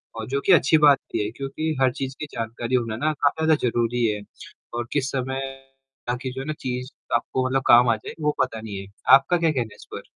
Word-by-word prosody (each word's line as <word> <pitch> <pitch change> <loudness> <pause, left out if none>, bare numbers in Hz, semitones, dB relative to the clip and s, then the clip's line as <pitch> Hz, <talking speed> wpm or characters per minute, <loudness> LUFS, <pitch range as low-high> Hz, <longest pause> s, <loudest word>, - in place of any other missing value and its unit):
और 110 -1 -5
जो 140 +2 -1
कि - - +4
अच्छी 160 0 +5
बात 140 -2 +6
भी - - 0
है - - -2
क्योंकि 140 +5 -3
हर 130 -1 +4
चीज़ 135 0 -5
की - - -3
जानकारी 115 +2 -3
होना 115 -3 0
ना 155 +5 0
काफ़ी 150 +3 0
ज़्यादा 160 - +5
ज़रूरी 120 +1 0
है 105 -2 -1 0.5
और 120 0 -3
किस 140 -2 0
समय 130 0 -2 0.7
आपकी 125 +1 -3
जो 130 +1 -6
है 135 - -7
ना 155 - -1
चीज़ 125 +1 -4 0.2
आपको 130 0 -1
मतलब 130 0 0
काम 120 +1 +7
आ 115 - +4
जाये 105 - -9
वो 150 0 +1
पता 115 -4 -2
नहीं 105 -3 -6
है। 95 - -9 0.3
आपका 140 +6 +2
क्या 165 -2 +2
कहना 120 -7 -2
है - - -16
इस - - -14
पर? - - -5
130 Hz, 240 wpm, -24 LUFS, 120-140 Hz, 0.7 s, काम